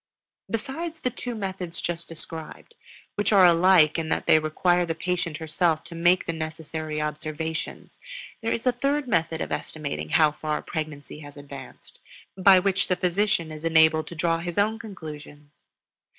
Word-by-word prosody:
Besides 315 +8 -4
the 250 - 0
two 245 0 -5
methods 190 -5 -4
just 170 -1 -3
described, 165 - -8 0.4
which 205 0 0
are 195 -3 +7
alike 170 -2 +5
in 160 -1 -3
that - - -1
they 155 - +6
require 175 +3 +2
the 165 -1 -2
patient 170 -2 -2
herself 160 0 0
to 170 - -10
make 175 +2 +3
the 170 - -2
necessary 155 -1 -5
observations, 155 +1 -4 0.4
there 225 - -1
is 230 - -2
a 250 - +5
third 275 +3 -1
method 165 -6 0
of - - -4
estimating 150 -3 -4
how 155 0 +4
far 150 0 -3
pregnancy 150 -2 -6
has 145 -1 -11
advanced, 140 -2 -11 0.4
by 190 0 +7
which 190 +1 +1
the 185 - +2
physician 180 -2 0
is 155 0 -8
enabled 160 -1 +4
to 170 - -8
draw 165 +1 +1
his 175 0 -5
own 215 +2 +2
conclusions. 150 -8 -10
165 Hz, 165 wpm, -25 LUFS, 155-190 Hz, 0.4 s, are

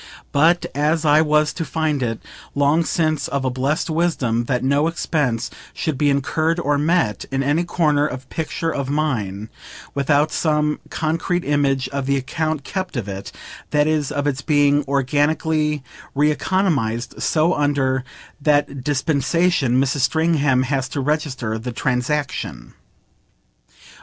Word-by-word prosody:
But 165 +5 +3
as 155 +3 +1
I 150 +1 +5
was 150 -1 +2
to 165 - -3
find 155 -3 -1
it 115 -2 -1 0.4
long 145 +4 +3
since 155 -4 0
of 140 0 -2
a 130 - +1
blest 135 +4 -1
wisdom 155 -9 0
that 125 0 -1
no 140 +4 +2
expense 135 -8 -1 0.2
should 155 - -2
be 145 +2 +2
incurred 155 +4 +1
or 145 -3 +1
met, 155 - +1
in 135 0 -1
any 145 +5 +1
corner 150 -4 +2
of 130 -1 -7
picture 165 0 -2
of 140 -1 -3
mine, 110 -9 -1 0.4
without 145 +2 +2
some 150 -1 +1
concrete 165 +3 -1
image 140 -2 +1
of 140 -1 -3
the 140 0 +2
account 155 +2 -2
kept 185 -4 -4
of 110 -4 -3
it, 100 0 -6 0.4
that 150 0 +3
is 155 -2 0
of 145 0 -2
its 140 -2 -1
being 145 0 +3
organically 150 +2 +1 0.3
re 150 +2 +3
economised, 150 - -1
so 160 +3 +2
under 140 -3 +1 0.4
that 145 -2 +1
dispensation 145 0 +1
Mrs. 135 +1 +1
Stringham 145 -2 +2
has 130 -1 -1
to - - -3
register 135 -6 -1
the 125 +3 -5
transaction. 125 - -2
145 Hz, 140 wpm, -21 LUFS, 130-155 Hz, 0.4 s, I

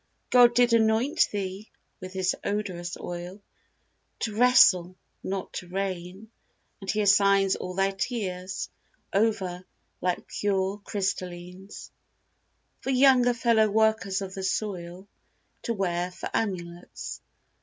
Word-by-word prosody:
God 240 -1 +6
did 245 -1 +4
anoint 225 +4 +3
thee 195 +1 -5 0.3
with 185 0 -8
His 190 -1 0
odorous 185 -4 -3
oil, 175 +3 -7 0.8
To 215 -2 -2
wrestle, 200 -7 +5 0.3
not 190 -1 -4
to 180 - -6
reign; 190 +2 -5 0.5
and 195 -2 -8
He 215 +1 +1
assigns 200 -1 +4
All 180 0 -6
thy 195 +1 +2
tears 190 -3 -4 0.4
over, 195 -4 0 0.4
like 180 -1 -1
pure 195 0 -1
crystallines, 185 -1 -5 0.9
For - - -5
younger 255 -2 +5
fellow 230 -2 +3
workers 215 -2 +1
of 190 -1 -7
the 190 - -5
soil 190 -2 -3 0.5
To 235 - -2
wear 180 -2 -1
for 180 - -7
amulets. 175 -5 -4
195 Hz, 115 wpm, -27 LUFS, 185-220 Hz, 0.9 s, God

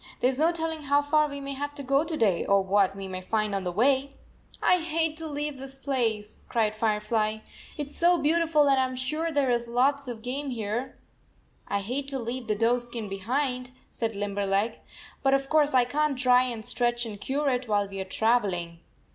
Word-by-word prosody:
There 255 - +3
s 265 - -6
no 325 +2 +4
telling 325 -2 -3
how 285 +1 +3
far 305 +1 +3
we 280 0 -6
may 275 0 -5
have 290 +1 -5
to 285 - -7
go 275 +2 +2
to 320 -1 -4
day, 195 - +2
or 200 -1 +3
what 195 0 +2
we 195 -1 -6
may 185 -1 -5
find 215 +2 -1
on 195 -1 -1
the 180 - -2
way." 270 +7 +2 0.2
" - - -19
I 360 - +5
hate 325 -1 -1
to 325 0 -4
leave 295 -2 -4
this 270 0 -8
place," 230 -6 -1
cried 220 -3 +1
Fire 215 -1 +1
fly, 215 0 -1 0.3
"it 290 -2 -4
s - - -9
so 345 +1 +4
beautiful, 310 -1 +3
and 270 -1 +4
I - - +3
am 255 0 -5
sure 305 +6 -2
there 280 -4 +2
is 235 0 0
lots 270 +4 +1
of 230 -3 -6
game 275 +3 -3
here." 230 +1 -3 0.4
" - - -37 0.3
I 200 0 -1
hate 255 +7 -3
to 275 -1 -3
leave 240 0 -4
the 215 - +1
doe 230 +3 +2
skin 240 -3 -6
behind," 250 +6 -2 0.2
said 225 -2 -2
Limberleg, 200 +2 -1 0.2
" - - -19
but 270 0 +4
of 275 0 -2
course 300 -3 +3
I 250 -1 +5
can 295 +3 0
t 255 - -2
dry 250 0 +5
and 230 -4 -5
stretch 240 -1 +1
and 205 -3 -8
cure 280 +6 0
it 250 -1 -1
while 205 -2 +1
we 195 0 -6
are - - -1
travel 215 0 +2
ing." 170 -1 -6
250 Hz, 230 wpm, -27 LUFS, 215-285 Hz, 0.4 s, I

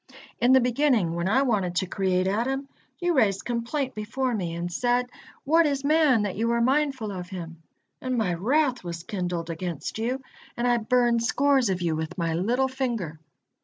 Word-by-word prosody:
In 245 +2 +4
the 265 - +7
beginning, 245 - +2
when 170 +2 -1
I 265 +6 +3
wanted 200 -9 0
to 185 - +1
create 185 0 0
Adam, 255 +8 -1 0.3
you 350 -1 0
raised 205 - +2
complaint 245 +3 -2
before 240 +4 -2
Me 175 -6 -2
and 175 +1 -4
said, 245 +3 +1 0.4
'What 325 +3 +4
is 280 -1 -1
man 290 -6 +4
that 200 -3 -3
Thou 230 +3 0
are 235 - +1
mindful 265 -3 +1
of 180 -2 -6
him!' 165 -4 -8 0.4
and 255 -1 -2
My 205 -6 +1
wrath 255 - +1
was 170 -1 -6
kindled 175 -4 -3
against 170 +3 -5
you 245 +4 -1 0.4
and 240 +1 0
I 240 -1 +3
burned 235 +1 +2
scores 270 0 +2
of 185 -1 -1
you 165 -2 0
with 160 0 -4
My 165 -2 0
little 235 +10 +1
finger. 235 - -3
230 Hz, 185 wpm, -26 LUFS, 180-260 Hz, 0.4 s, the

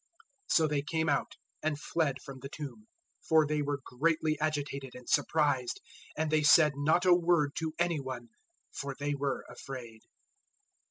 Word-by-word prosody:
016:008 - - +2
So 160 -1 +5
they 145 -2 0
came 160 +2 -1
out, 140 - 0 0.3
and 155 -1 -1
fled 145 -3 -1
from 135 -1 -9
the 135 +1 -8
tomb, 130 -8 -8 0.3
for 160 -1 +4
they 150 0 0
were 145 -1 -2
greatly 155 +3 +1
agitated 145 -3 -2
and 125 -1 -11
surprised; 145 -6 +1 0.4
and 155 0 0
they 155 0 +4
said 150 0 +6
not 155 +5 +2
a 180 - +7
word 170 -4 +3
to 160 -1 -3
any 170 -2 +1
one, 130 -3 -6 0.4
for 140 -1 -5
they 145 +1 -1
were 140 -1 -2
afraid. 120 -4 -8
145 Hz, 165 wpm, -31 LUFS, 135-155 Hz, 0.4 s, a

